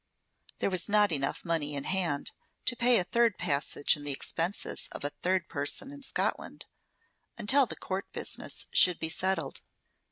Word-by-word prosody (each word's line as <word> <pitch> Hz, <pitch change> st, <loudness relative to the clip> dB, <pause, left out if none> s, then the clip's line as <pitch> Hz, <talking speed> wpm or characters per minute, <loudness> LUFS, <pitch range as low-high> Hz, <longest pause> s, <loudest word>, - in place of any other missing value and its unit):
There -, -, -1 dB
was 185 Hz, +2 st, 0 dB
not 210 Hz, -2 st, +4 dB
enough 135 Hz, -3 st, -1 dB
money 155 Hz, -4 st, 0 dB
in 140 Hz, -, -2 dB
hand 170 Hz, -6 st, 0 dB, 0.3 s
to 250 Hz, -, +2 dB
pay 240 Hz, 0 st, +5 dB
a -, -, +2 dB
third 235 Hz, +2 st, +2 dB
passage 145 Hz, 0 st, +1 dB
and 145 Hz, -, -9 dB
the -, -, +3 dB
expenses 165 Hz, +7 st, -2 dB
of -, -, -7 dB
a 145 Hz, -, -1 dB
third 180 Hz, +4 st, -1 dB
person 145 Hz, -, -1 dB
in 285 Hz, 0 st, -10 dB
Scotland, 270 Hz, -, -2 dB, 0.7 s
until 255 Hz, +4 st, +4 dB
the -, -, -5 dB
court 190 Hz, +1 st, -5 dB
business -, -, -2 dB
should 180 Hz, -2 st, +5 dB
be 160 Hz, -, -2 dB
settled. 190 Hz, +3 st, -1 dB
180 Hz, 165 wpm, -30 LUFS, 145-210 Hz, 0.7 s, pay